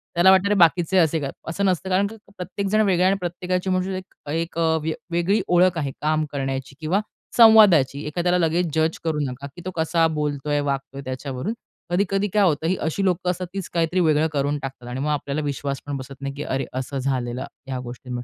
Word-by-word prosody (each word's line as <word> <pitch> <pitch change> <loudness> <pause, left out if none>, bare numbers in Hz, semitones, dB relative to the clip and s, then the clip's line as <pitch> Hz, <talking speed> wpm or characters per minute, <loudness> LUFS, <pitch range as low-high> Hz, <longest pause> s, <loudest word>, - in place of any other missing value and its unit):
त्याला 180 +2 +6
वाटतं 190 +1 +4
अरे, 205 - +2
बाकीचे 170 +3 +4
असे 160 -2 +3
काय? 140 - -3 0.2
असं 200 +4 -1
नसतं. 190 0 0
कारण 195 +2 +2 0.3
प्रत्येकजण 200 +3 -1
वेगळा 185 -3 +3
आहे 190 - +5
आणि 195 - +1
प्रत्येकाची 180 +1 -2
म्हणू 185 0 +1
शकतो 185 -5 -10
एक 165 +1 -3
अ, 160 -1 +3 0.3
वेगळी 175 +5 +2
ओळख 180 0 +4
आहे 140 -4 -1
काम 155 +1 +1
करण्याची 135 -1 -3
किंवा 175 +7 +1 0.4
संवादाची 195 - +7
एखाद्याला 175 +3 +1
लगेच 170 +1 +1
जज 160 +1 +1
करू 160 -2 -1
नका, 135 0 -4
की 175 - -10
तो 185 - -3
कसा 165 0 +2
बोलतोय, 150 -2 -1
वागतोय 140 -1 -3
त्याच्यावरून? 130 - -4 0.4
कधी-कधी 195 +2 +1
काय 210 -1 +4
होतं 160 -2 +2
ही 185 - +2
अशी 160 +5 -1
लोकं 180 -1 +1
असतात 180 +1 -5
तीच 195 -2 -4
काहीतरी 170 +2 +1
वेगळं 155 -2 +3
करून 145 +1 0
टाकतात 130 -2 -7
आणि 125 +2 -4
मग 150 +2 -1
आपल्याला 145 0 -2
विश्वास 140 -1 -3
पण 145 -1 -3
बसत 135 +1 -8
नाही, 140 0 -4
की 150 - -4
अरे, 135 +1 -2
असं 130 +2 -4
झालेलं 130 -2 -2 0.2
ह्या 130 -1 -3
गोष्टी. 125 0 -9
160 Hz, 200 wpm, -23 LUFS, 140-185 Hz, 0.4 s, संवादाची